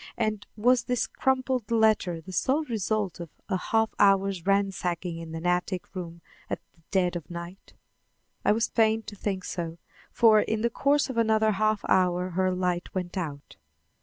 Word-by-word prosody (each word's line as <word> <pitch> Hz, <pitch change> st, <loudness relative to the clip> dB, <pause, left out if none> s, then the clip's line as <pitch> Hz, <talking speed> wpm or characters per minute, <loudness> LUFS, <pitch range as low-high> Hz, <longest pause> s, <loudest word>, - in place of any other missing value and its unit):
and 215 Hz, -3 st, -1 dB
was 245 Hz, +3 st, +3 dB
this 250 Hz, -2 st, 0 dB
crumpled 260 Hz, -3 st, 0 dB
letter 220 Hz, -7 st, +2 dB
the 185 Hz, +4 st, -10 dB
sole 265 Hz, -, +1 dB
result 215 Hz, -, -2 dB
of 170 Hz, -2 st, -7 dB, 0.2 s
a 190 Hz, -, +1 dB
half 220 Hz, +4 st, +1 dB
hour's 195 Hz, -2 st, +3 dB
ransacking 185 Hz, -3 st, 0 dB
in 165 Hz, -1 st, -7 dB
an 165 Hz, +1 st, -6 dB
attic 180 Hz, +1 st, -1 dB
room 170 Hz, -2 st, -7 dB, 0.3 s
at -, -, -2 dB
the 165 Hz, -, -28 dB
dead 180 Hz, -3 st, +1 dB
of 170 Hz, -4 st, -6 dB
night? 170 Hz, +2 st, -9 dB, 0.7 s
I -, -, +4 dB
was 225 Hz, +2 st, +2 dB
fain 220 Hz, -1 st, +2 dB
to 210 Hz, -, -9 dB
think 190 Hz, -2 st, -3 dB
so, 170 Hz, -2 st, -4 dB, 0.3 s
for 220 Hz, -2 st, +6 dB
in 215 Hz, +1 st, 0 dB
the 235 Hz, +1 st, +1 dB
course 280 Hz, +2 st, +2 dB
of 245 Hz, -, -7 dB
another 220 Hz, -1 st, +3 dB
half 215 Hz, +1 st, +1 dB
hour 180 Hz, 0 st, +2 dB
her 185 Hz, +2 st, +1 dB
light 180 Hz, -1 st, -2 dB
went 180 Hz, -1 st, -3 dB
out. 150 Hz, -6 st, -5 dB
195 Hz, 170 wpm, -27 LUFS, 180-220 Hz, 0.7 s, for